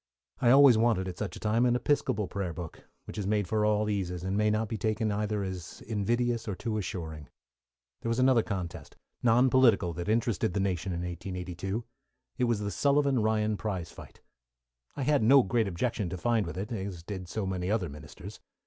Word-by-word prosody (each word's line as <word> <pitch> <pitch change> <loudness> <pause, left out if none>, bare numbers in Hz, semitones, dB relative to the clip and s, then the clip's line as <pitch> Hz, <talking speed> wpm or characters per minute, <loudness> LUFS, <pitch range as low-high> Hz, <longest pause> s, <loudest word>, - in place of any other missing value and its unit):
I 120 - +3
always 135 -3 +7
wanted, 110 -5 +2
at 90 - -6
such 100 -5 -4
a - - -8
time, 110 +3 +1
an 120 -1 +3
Episcopal 120 -6 0
prayer 95 -3 -3
book, 80 0 -8 0.2
which - - -7
is 100 - -2
made 105 -2 +1
for 105 +2 +1
all 105 0 +2
eases, 90 -4 -2
and 95 +1 -1
may 105 +1 +2
not 110 +1 0
be 110 - -3
taken 110 +2 0
either 105 0 -1
as 95 -3 -6
invidious 115 +3 -1
or 100 - -2
too 110 +2 -3
assuring. 80 -7 -6 0.7
There 115 - -3
was 115 - 0
another 130 -2 +4
contest, 95 -6 -5 0.3
non 125 +2 +4
political, 110 -9 +4
that 85 +4 -4
interested 110 -5 +1
the - - +1
nation 95 -1 -1
in 85 -1 -3
1882. 90 +3 -4 0.6
It 125 - +3
was 115 -3 0
the 100 0 -2
Sullivan 140 +1 +2
Ryan 110 -1 +1
prize 95 -6 -4
fight. - - -13 0.8
I 140 - -1
had 145 0 +3
no 130 +4 +6
great 115 +1 +1
objection 95 +1 -2
to 90 - -4
find 115 +2 +1
with 80 - -6
it, 105 +5 -4
as 95 -6 -5
did 95 -1 -6
so 110 +1 -2
many 95 -1 -2
other 105 -4 +1
ministers. 75 0 -10
105 Hz, 200 wpm, -29 LUFS, 90-115 Hz, 0.8 s, always